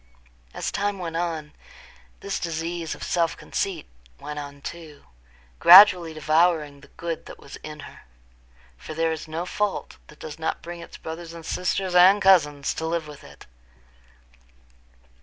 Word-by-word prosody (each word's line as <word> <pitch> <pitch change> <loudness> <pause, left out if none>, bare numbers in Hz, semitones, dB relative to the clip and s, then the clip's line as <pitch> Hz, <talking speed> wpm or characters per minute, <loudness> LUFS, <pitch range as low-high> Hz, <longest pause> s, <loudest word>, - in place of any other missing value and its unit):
As - - -4
time 205 +1 -1
went 170 -3 -5
on, 165 -3 -3 0.7
this 200 - -3
disease 165 0 -4
of - - -10
self 170 -1 0
conceit 185 -6 -3 0.3
went 150 0 -6
on 140 -1 -9
too, 160 -3 -9 0.6
gradually 180 -2 +8
devouring 155 -1 +1
the - - -16
good 165 -1 -5
that - - -10
was 140 - -11
in 150 -1 -9
her. - - -12 0.8
For 155 - -9
there 165 0 +1
is 160 0 -5
no 160 +3 -4
fault 205 +2 -3
that 150 - -16
does 155 0 -9
not 160 - -3
bring 175 0 -8
its 170 - -11
brothers 165 +1 -8
and 165 -1 -10
sisters 180 +1 -2
and 185 +3 +7
cousins 150 -8 +3
to 160 - -4
live 165 -1 -2
with 150 -1 -12
it. - - -15
165 Hz, 155 wpm, -24 LUFS, 155-175 Hz, 0.8 s, gradually